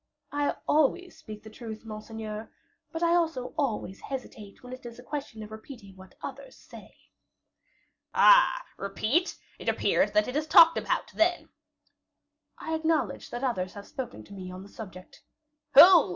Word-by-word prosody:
"I 290 Hz, 0 st, 0 dB
always 330 Hz, +5 st, +2 dB
speak 215 Hz, -1 st, -10 dB
the 220 Hz, -, -11 dB
truth, 220 Hz, -1 st, -9 dB
monseigneur; 215 Hz, 0 st, -7 dB, 0.4 s
but 325 Hz, +1 st, -3 dB
I 340 Hz, 0 st, +4 dB
also 320 Hz, -8 st, 0 dB
always 220 Hz, -8 st, -2 dB
hesitate 235 Hz, -7 st, -8 dB
when 250 Hz, 0 st, -9 dB
it 255 Hz, -, -10 dB
is 235 Hz, -1 st, -9 dB
a 245 Hz, -, -12 dB
question 275 Hz, -6 st, -6 dB
of 210 Hz, -, -11 dB
repeating 220 Hz, -3 st, -11 dB
what 190 Hz, 0 st, -15 dB
others -, -, -8 dB
say." -, -, -14 dB, 1.2 s
"Ah! -, -, +6 dB
repeat? 215 Hz, -, -1 dB, 0.2 s
It -, -, -2 dB
appears -, -, +2 dB
that 315 Hz, -, +3 dB
it 250 Hz, -, -5 dB
is 305 Hz, +1 st, -1 dB
talked 330 Hz, +1 st, +8 dB
about, -, -, -2 dB
then?" 350 Hz, +2 st, +1 dB, 1.1 s
"I 320 Hz, -, -5 dB
acknowledge 315 Hz, -, -1 dB
that 240 Hz, +2 st, -6 dB
others 185 Hz, -8 st, -1 dB
have 200 Hz, 0 st, -9 dB
spoken 255 Hz, -2 st, -7 dB
to 200 Hz, -, -14 dB
me 185 Hz, -2 st, -8 dB
on 185 Hz, +1 st, -9 dB
the 200 Hz, -, -14 dB
subject." 185 Hz, -4 st, -11 dB, 0.5 s
"Who?" 340 Hz, -, +9 dB
245 Hz, 160 wpm, -28 LUFS, 215-315 Hz, 1.2 s, Who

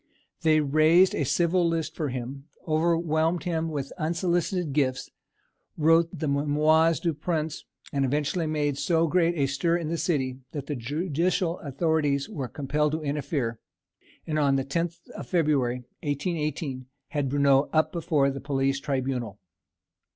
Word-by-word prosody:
They 155 Hz, -2 st, +4 dB
raised 155 Hz, +6 st, +4 dB
a -, -, 0 dB
civil 170 Hz, +5 st, +2 dB
list 165 Hz, -1 st, -2 dB
for 155 Hz, -4 st, -2 dB
him, 130 Hz, +2 st, -6 dB, 0.2 s
overwhelmed 165 Hz, +1 st, +1 dB
him 165 Hz, -2 st, -1 dB
with 140 Hz, -3 st, -4 dB
unsolicited 170 Hz, 0 st, 0 dB
gifts, 130 Hz, -3 st, 0 dB, 0.7 s
wrote 165 Hz, +2 st, +4 dB
the 160 Hz, -3 st, -4 dB
"Mémoires 150 Hz, +3 st, +3 dB
du 170 Hz, -3 st, 0 dB
Prince," 155 Hz, 0 st, -3 dB, 0.3 s
and 140 Hz, -1 st, +1 dB
eventually 150 Hz, +5 st, 0 dB
made 145 Hz, -2 st, -1 dB
so 165 Hz, +3 st, +2 dB
great 170 Hz, +1 st, +2 dB
a 140 Hz, -4 st, +2 dB
stir 140 Hz, +6 st, +1 dB
in 165 Hz, -3 st, -4 dB
the 165 Hz, 0 st, -2 dB
city 130 Hz, -6 st, -1 dB
that 145 Hz, -3 st, -4 dB
the 145 Hz, -, -3 dB
judicial 165 Hz, -, -1 dB
authorities 145 Hz, -1 st, 0 dB
were 135 Hz, -4 st, -5 dB
compelled 150 Hz, +2 st, -1 dB
to 160 Hz, 0 st, -2 dB
interfere, 140 Hz, -5 st, -2 dB, 0.7 s
and 155 Hz, -1 st, -1 dB
on 140 Hz, -2 st, +3 dB
the 135 Hz, -1 st, 0 dB
10th 170 Hz, +4 st, -3 dB
of -, -, -8 dB
February, 140 Hz, -8 st, +1 dB, 0.2 s
1818, 145 Hz, -3 st, -3 dB, 0.2 s
had 145 Hz, -3 st, -1 dB
Bruneau 140 Hz, 0 st, +3 dB
up 155 Hz, 0 st, +2 dB
before 150 Hz, -5 st, +1 dB
the 135 Hz, 0 st, -6 dB
Police 135 Hz, 0 st, 0 dB
Tribunal. 130 Hz, -7 st, -2 dB
150 Hz, 145 wpm, -26 LUFS, 140-165 Hz, 0.7 s, They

